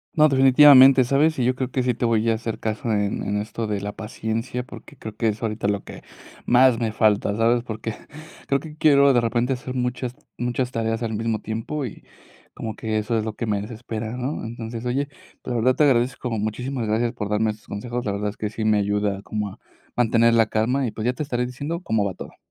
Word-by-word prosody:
No, 155 0 +6
definitivamente, 135 0 +7
¿sabes? 145 +5 +2
Y 125 - +1
yo 125 - +3
creo 130 -1 -3
que 130 -1 -1
sí 125 0 +1
te 120 - -5
voy 115 -1 +2
a - - +3
hacer 110 0 -4
caso 110 +1 -2
en 105 -1 0
en 105 0 -1
esto 110 +2 -4
de 105 -2 -2
la 100 +1 -4
paciencia, 110 +3 -4
porque 145 +2 -13
creo 110 -3 -8
que 115 - 0
es 110 +1 -2
ahorita 110 -2 -2
lo 100 -1 -1
que - - -10 0.4
más 125 -1 +5
me 115 -2 -1
falta, 105 -1 +2
¿sabes? 115 +1 +2
Porque 110 -1 -5 0.5
creo 140 - +2
que 155 0 -10
quiero 140 -3 +5
de 120 - +4
repente 120 +2 0
hacer 130 0 -6
muchas 125 0 -2 0.2
muchas 125 +1 -2
tareas 115 0 -2
al 110 -1 -2
mismo 110 0 -1
tiempo, 115 +6 -4
y 115 - -9 0.5
como 110 -1 -5
que 110 -1 -2
eso 110 +2 -1
es 110 - -1
lo 110 - -3
que 115 - -4
me 105 -2 -1
desespera, 110 +1 -6
¿no? 130 +4 -3
Entonces, 115 0 -6
oye, 135 +3 0 0.4
la - - -4
verdad 125 +2 +2
te - - +3
agradezco, 125 -2 +1
muchísimas 115 +3 -3
gracias 115 +2 0
por 105 -2 -4
darme 110 +1 +1
estos 105 0 -14
consejos, 120 +4 -4
la 105 - 0
verdad 105 +1 -2
es 105 - -10
que 105 - -3
sí 110 +1 -4
me 110 -1 +3
ayuda 100 -1 0
como 105 0 -3
a - - -14 0.4
mantener 115 -1 +3
la 115 -1 +4
calma 125 +5 0
y, - - -4
pues, 110 +1 -5
ya 125 - +2
te 140 - -6
estaré 125 -4 -1
diciendo 145 +7 -5
cómo 110 - 0
va 95 -3 -3
todo. - - -10
115 Hz, 230 wpm, -23 LUFS, 110-125 Hz, 0.5 s, definitivamente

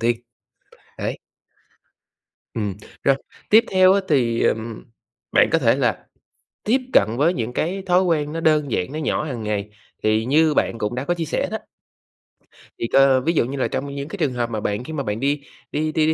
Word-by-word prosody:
tiên. 120 +1 +2 0.8
Đấy. - - -3 1.4
Ừm, 105 -3 -2 0.3
rồi, 135 - +4 0.3
tiếp 220 +2 +7
theo 185 0 +6
á 200 - +2
thì, 120 -6 +2
ừm, 110 0 -1 0.5
bạn - - +5
có - - +3
thể - - +3
là - - -1 0.6
tiếp 235 +5 +3
cận 110 +3 +4
với 160 +7 +3
những 115 -5 -3
cái 180 +9 -2
thói 180 +1 +4
quen 155 -5 0
nó 165 - -3
đơn 155 -3 +2
giản, 90 +10 -1
nó 155 - -4
nhỏ 150 0 -1
hàng 125 -7 -5
ngày, 105 -1 -2 0.3
thì 110 +1 +2
như 150 +3 +3
bạn 115 - 0
cũng 105 +2 -2
đã 130 +2 -3
có 175 - 0
chia 170 -2 -3
sẻ - - -1
đó - - -2 1.2
Thì, 115 - -1
cơ 135 0 +5
ví 165 +6 +1
dụ 155 - +2
như 135 +3 -5
là 130 - +1
trong 140 +1 -4
những 140 0 -4
cái 200 - -7
trường 150 -7 0
hợp 120 -1 -1
mà 110 - -3
bạn 105 +2 -2
khi 160 +5 -7
mà 140 - -2
bạn 105 -1 -3
đi 140 +2 0 0.3
đi 155 +1 -1
đi 155 0 +2
đi 160 - +3
140 Hz, 210 wpm, -22 LUFS, 115-160 Hz, 1.4 s, tiếp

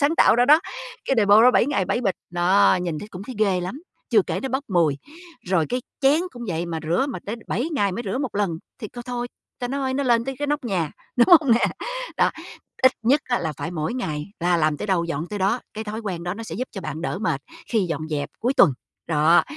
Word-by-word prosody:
sáng 295 +3 +2
tạo 220 - +6
ra 245 - +5
đó, 305 +3 +7 0.4
cái 270 - +1
đề-pô 210 0 +6
đó 250 - +8
7 - - +3
ngày 265 -10 +1
7 240 - 0
bịch 195 -7 0 0.2
đó 180 +2 +4
nhìn 165 -4 -2
thấy 210 - -8
cũng 185 -2 -8
thấy 255 - -7
ghê 195 -4 +2
lắm, 220 - -6 0.3
chưa - - +5
kể - - -3
nó 265 - -2
bốc 265 +3 -1
mùi. 165 -7 +2 0.5
Rồi 175 -4 +2
cái 250 0 -1 0.2
chén 285 +4 +4
cũng 240 - -9
vậy, 170 0 -2
mà 165 -1 -3
rửa 175 - +1
mà 205 - -5
tới 215 - -3
7 260 +8 -1
ngày 200 -7 +1
mới 235 - -4
rửa 255 - -1
1 265 -7 -3
lần 195 -6 0 0.2
thì 215 - -5
c 240 +2 -9
thôi, 245 -1 -3 0.3
ta 245 - -3
nói 270 -1 -1
nó 280 - 0
lên 235 -2 +3
tới 270 0 -3
cái 290 - -1
nóc 295 -1 -1
nhà, 180 -9 -1 0.3
đúng 240 - +5
hông 275 -6 +2
nè? 235 - +4 0.5
Đó, - - +3 0.5
ít 260 0 +7
nhất 270 +6 +4
á, 245 - 0
là 160 - -2
phải 165 - -4
mỗi 160 +4 -3
ngày 150 -12 -3
là 175 0 +3
làm 155 -2 +1
tới - - -5
đâu 185 -4 +1
dọn 165 0 -3
tới 210 - -4
đó. 200 +6 +1
Cái 220 +1 -5
thói 215 +1 -5
quen 185 -6 -4
đó 180 +2 -3
nó 225 - -7
sẽ 165 -7 -7
giúp 255 +5 -3
cho 195 - -6
bạn 155 -2 -5
đỡ 180 - -2
mệt 165 -11 -1 0.3
khi 225 - +2
dọn 160 -4 -3
dẹp 145 -2 -2
cuối 250 +4 +1
tuần. 145 - +6 0.4
Đó, 160 +1 +5
205 Hz, 260 wpm, -23 LUFS, 170-250 Hz, 0.5 s, đó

